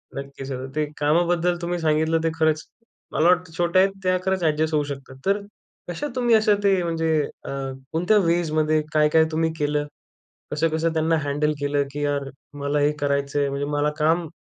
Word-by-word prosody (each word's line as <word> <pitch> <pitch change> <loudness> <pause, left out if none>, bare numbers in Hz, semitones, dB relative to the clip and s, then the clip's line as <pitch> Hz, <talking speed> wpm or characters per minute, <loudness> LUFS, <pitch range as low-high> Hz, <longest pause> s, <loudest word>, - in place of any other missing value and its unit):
नक्कीच 140 0 -7 0.2
ते 155 0 +1
कामाबद्दल 170 +3 +2
तुम्ही 175 0 -2
सांगितलं, 160 +1 +2
ते 165 - +2
खरंच 155 -1 +2 0.5
मला 155 - +2
वाटतं, 180 -1 +2
छोट्या 175 +2 +3
आहेत 195 - +3
त्या 185 0 +2
खरंच 190 -2 0
ॲडजस्ट 155 0 +1
होऊ 150 - +2
शकतात. 135 -2 -8
तर 200 +2 +2 0.5
कशा 175 - -3
तुम्ही 240 -2 +3
असं 215 -1 +4
ते 195 -2 +3
म्हणजे 165 -1 -1 0.4
अ, - - -6 0.4
कोणत्या 180 +6 +2
वेजमध्ये 155 -2 +2
काय-काय 155 +1 +4
तुम्ही 160 +1 0
केलं? 145 0 0 0.6
कसं-कसं 160 +2 0
त्यांना 160 +1 +2
हँडल 145 +2 0
केलं, 145 0 +1
की 145 +1 -4
यार 140 -1 -1 0.3
मला 145 +1 0
हे 145 +1 +3
करायचंय, 140 0 0
म्हणजे 140 +1 -2
मला 145 +1 +2
काम 165 +2 +2
155 Hz, 165 wpm, -23 LUFS, 145-170 Hz, 0.6 s, असं